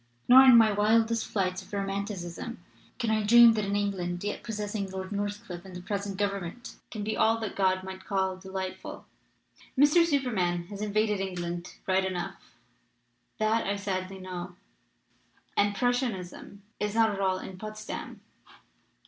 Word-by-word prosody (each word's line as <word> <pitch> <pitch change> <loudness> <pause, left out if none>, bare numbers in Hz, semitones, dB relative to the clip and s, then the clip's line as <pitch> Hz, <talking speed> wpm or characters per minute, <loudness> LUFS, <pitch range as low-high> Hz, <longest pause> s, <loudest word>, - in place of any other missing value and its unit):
Nor 260 +2 +9
in 255 -3 +9
my 225 -2 +6
wildest 225 +2 +2
flights 185 -2 -1
of 190 - -16
romanticism 200 +1 -4 0.4
can 235 -3 0
I 215 0 +2
dream 235 +2 +8
that 215 -2 -1
an 200 +1 -1
England 185 -3 -2
yet 205 - -3
possessing 210 -2 -4
Lord 190 0 -6
Northcliffe 205 -3 -4
and 190 -1 -11
the 180 - -6
present 200 0 -3
Government 200 +2 -3
can 215 -3 -5
be 220 +1 -2
all 225 +1 +3
that 220 -2 -5
God 185 -1 +2
might 190 0 -8
call 190 -1 0
de 190 +1 -12
lightful. 190 -1 -6 0.7
Mr. 295 +5 +6
Superman 220 - 0
has 205 -1 -7
invaded 210 0 +1
England 175 -2 -4
right 190 0 +2
enough, 180 -2 -5 0.8
that 220 0 +1
I 200 - 0
sadly 190 -1 -3
know; 180 -1 -7 1.0
and 205 0 +2
Prussianism 225 -6 -2 0.2
is 210 0 -2
not 220 -3 +3
all 190 -1 +1
in 185 0 -8
Potsdam. 215 0 -7
200 Hz, 150 wpm, -28 LUFS, 185-220 Hz, 1.0 s, Nor